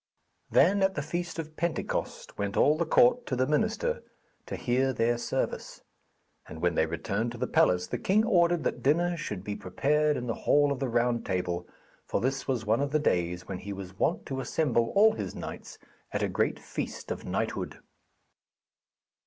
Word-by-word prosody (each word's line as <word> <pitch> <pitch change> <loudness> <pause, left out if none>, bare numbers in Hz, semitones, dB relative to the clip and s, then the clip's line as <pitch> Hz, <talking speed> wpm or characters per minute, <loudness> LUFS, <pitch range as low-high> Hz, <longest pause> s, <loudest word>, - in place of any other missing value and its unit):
Then 195 +7 +4
at 190 0 +2
the 145 - -2
feast 170 +2 -4
of 155 -1 -6
Pentecost 170 +1 -3
went 100 0 -3
all 150 - +5
the 170 +1 -1
court 245 +6 +4
to 130 - -1
the 130 +1 +2
minster 225 - 0 0.5
to - - -4
hear 130 +2 +1
their 120 0 +2
service; - - -3 0.6
and 80 - -9
when 90 +1 +1
they 80 - +2
returned 100 +8 -2
to - - -8
the - - -1
palace 90 0 +3
the - - -4
king 215 +4 +3
ordered 175 -6 +3
that - - -2
dinner 175 +5 +2
should 105 - -5
be 105 0 -4
prepared 150 +11 +1
in 125 - -4
the 115 - -1
hall 145 +4 +3
of 140 - -2
the 135 - -1
Round 120 0 +1
Table, 90 -2 -2 0.4
for - - 0
this 135 +3 -1
was 125 -5 -1
one 110 +4 +2
of 140 - 0
the 155 - +3
days 90 - 0
when 95 -2 -4
he 100 +1 -6
was 95 0 -9
wont - - +1
to 135 -1 -4
assemble 120 -6 +1
all 215 +2 +7
his 220 - -5
knights - - -7 0.3
at - - -1
a - - +2
great - - 0
feast - - -5
of - - -4
knighthood. - - -3
135 Hz, 190 wpm, -29 LUFS, 100-165 Hz, 0.6 s, all